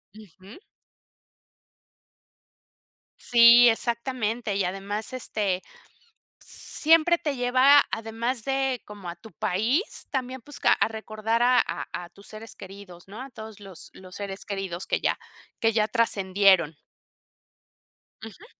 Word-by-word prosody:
Ujú. 200 - -15 2.6
Sí, 235 0 +7
exactamente. 235 -2 -2
Y 200 - 0
además, 200 +5 -4
este, 205 -7 -2 0.8
siempre 330 +2 +2
te 295 -4 -3
lleva 255 +3 +5
además 225 +2 -3
de 270 -2 -1
como 200 -4 -9
a 170 - -7
tu 220 +4 -15
país, 225 - -1
también, 260 -2 -4
pues, 290 +4 -10
ca - - +4
a - - +1
recordar 220 +1 -3
a 250 0 +4
a - - -3 0.2
a - - -16
tus 200 - -18
seres 220 +1 -10
queridos, 195 -2 -12
¿no?, 215 +6 -9
a 270 - -8
todos 220 -3 -11
los 195 -4 -12
los 185 -1 -13
seres 200 -1 -7
queridos 195 -3 -5
que - - 0
ya - - 0 0.4
que 225 -1 +2
ya 215 -1 +2
trascendieron. 195 -8 +2 1.5
Ujú. 335 - -13
220 Hz, 125 wpm, -25 LUFS, 195-250 Hz, 2.6 s, Sí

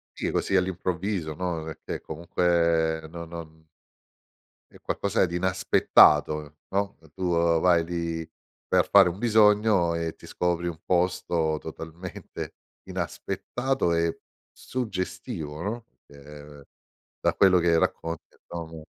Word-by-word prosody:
Sì, - - -2
così 95 - 0
all'improvviso, 90 -2 -1
no, 85 0 -3
perché 80 0 -6
comunque 85 0 +1
no 85 +1 -7
non 80 -1 -10 1.0
è - - -16
qualcosa 100 0 +1
di 85 -1 -5
inaspettato, 75 -4 +4
no, 100 +1 -1 0.2
tu 95 0 -2 0.3
vai 85 -1 +4
lì 85 -1 -3 0.4
per - - +2
fare - - +7
un 90 +3 -7
bisogno, 105 -5 +4
e 85 -1 -3
ti - - -15
scopri 85 -1 -1
un 85 -2 -5
posto 85 -3 +1
totalmente 80 +2 -8 0.3
inaspettato 130 -8 -2
e 85 0 0 0.3
suggestivo, 95 - -5
no, 115 +5 -4 0.2
che 75 0 -13 0.6
da - - +2
quello 95 -2 +5
che 85 -1 +3
racconti 85 0 -2
abbiamo 80 -2 -9
85 Hz, 115 wpm, -26 LUFS, 80-95 Hz, 1.0 s, fare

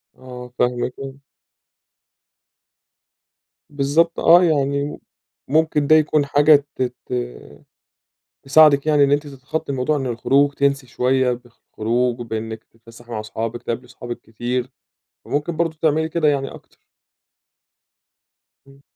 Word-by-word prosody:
آه، 125 -1 -11
فاهمِك، 125 0 0
آه. 135 -1 -6 2.6
بالضبط 145 +4 +1
آه، 175 +2 +6
يعني 140 -3 0 0.5
ممكن 150 0 +1
ده 155 - +6
يكون 150 -1 +2
حاجة 145 0 +4
ت - - -6 0.2
ت - - -7 1.3
تساعدِك 145 +1 +5
يعني 150 -2 +4
إن 140 - +2
أنتِ 145 +1 +1
تتخطي 140 +3 -5
الموضوع 135 +3 0
إن 135 - -3
الخروج 135 +4 +2
تنسي 140 -2 0
شوية 130 +1 +1
بالخروج 120 0 -3
وبإنِك 110 -1 -5
تتفسحي 115 +1 -17
مع 110 -1 -3
صحابِك، 115 +2 -5
تقابلي 120 +1 -4
صحابِك 120 -1 -8
كتير، 120 +3 -4 0.5
وممكن 155 +3 -2
برضه 165 -2 -1
تعملي 160 0 +1
كده 160 -1 0
يعني 140 -2 +1
أكتر. - - -16 1.9
امم. 135 0 -20
135 Hz, 115 wpm, -20 LUFS, 125-150 Hz, 2.6 s, آه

